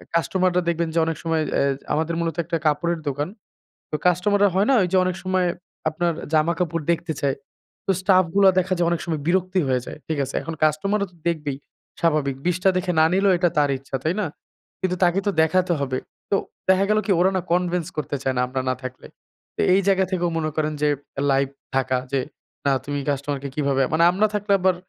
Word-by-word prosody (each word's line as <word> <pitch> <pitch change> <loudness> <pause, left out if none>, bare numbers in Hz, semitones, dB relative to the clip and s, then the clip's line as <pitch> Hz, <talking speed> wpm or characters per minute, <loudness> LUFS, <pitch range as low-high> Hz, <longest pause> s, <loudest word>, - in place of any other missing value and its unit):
কাস্টমাররা 180 +1 +2
দেখবেন 170 0 0
যে - - +4
অনেক 165 -1 -2
সময় 165 -1 +1
অ্যা - - +3 0.3
আমাদের 160 +2 0
মূলত 165 -1 -1
একটা 165 +1 -2
কাপড়ের 165 +3 +1
দোকান। 145 +3 -2 0.6
তো - - -3
কাস্টমাররা 200 +3 +3
হয় 195 +3 +3
না, - - +5
ওইযে 185 +1 +1
অনেক 185 -1 -1
সময় 185 -1 +1 0.4
আপনার 170 +2 -1 0.2
জামাকাপড় 165 +1 +1
দেখতে 170 0 -1
চায়। 140 -1 +1 0.5
তো - - +2
স্টাফগুলা 190 0 +4
দেখা 185 +1 0
যায় 170 -1 +2
অনেক 170 -1 0
সময় 160 -3 -2
বিরক্তি 185 +1 +1
হয়ে 130 -1 +1
যায়, - - -8
ঠিক 160 - -2
আছে। 130 - -7
এখন 165 +4 -5
কাস্টমাররা 195 +7 +1
তো - - -23
দেখবেই 150 -5 -1 0.4
স্বাভাবিক। 150 -5 +1
২০ 180 0 +2
টা 195 - +6
দেখে 185 0 0
না 160 - +6
নিলেও 195 +1 +4
এটা 175 0 +2
তার 145 -1 +4
ইচ্ছা, 135 0 -7
তাই 160 - +1
না? - - 0 0.5
কিন্তু 185 -1 0
তাকে 175 +2 +3
তো - - +3
দেখাতে 180 +3 +2
হবে। 130 -2 -1 0.3
তো - - +3 0.3
দেখা 190 +1 +5
গেলো 215 0 +3
কি? 200 - +1
ওরা 185 +2 +4
না - - 0
কনভিন্স 180 -2 0
করতে 150 -1 -2
চায় 130 - +1
না - - +3
আমরা 130 +1 -2
না - - +2
থাকলে। 130 0 -7 0.5
তা - - -1
এই 195 - +4
জায়গা 190 -1 +4
থেকেও 175 -2 0
মনে 155 -1 -1
করেন 155 -1 0
যে 150 - +3 0.4
লাইভ 135 0 +2 0.3
থাকা 130 -1 +1
যে, 140 - +1 0.5
না, 140 - +4
তুমি 145 0 -2
কাস্টমার 140 0 -2
কে 140 - -4
কিভাবে 140 -2 +1
মানে 160 +1 +4
আমরা 200 +4 +2
থাকলে 205 0 -2
আবার 185 0 +3
170 Hz, 205 wpm, -23 LUFS, 150-185 Hz, 0.6 s, টা